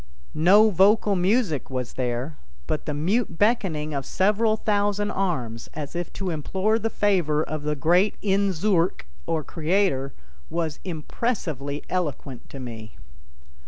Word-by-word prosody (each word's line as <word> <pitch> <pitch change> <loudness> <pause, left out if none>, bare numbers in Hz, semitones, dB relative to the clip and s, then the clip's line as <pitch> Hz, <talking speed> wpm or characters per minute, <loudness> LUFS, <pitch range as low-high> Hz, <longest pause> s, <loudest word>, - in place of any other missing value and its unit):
No 200 +8 +6
vocal 200 +2 +4
music 185 - +1
was 130 -2 -4
there, 125 +4 -3 0.3
but 155 - -3
the 150 - -1
mute 180 +4 0
beckoning 180 -9 +1
of 140 -1 -2
several 215 - +2
thousand 205 -1 0
arms, 125 - -2
as 150 +1 -6
if 175 0 -3
to 190 -2 -3
implore 190 +8 0
the 225 +1 -1
favor 175 -9 +1
of 155 -1 -4
the 150 +1 -1
great 175 +8 +3
Inzoork 195 - +1 0.2
or 160 -2 0
Creator, 160 -4 0 0.4
was 165 -2 -2
impressively 155 - -3
eloquent 145 -8 -3
to 135 - -9
me. 115 -4 -8
170 Hz, 130 wpm, -25 LUFS, 150-205 Hz, 0.4 s, No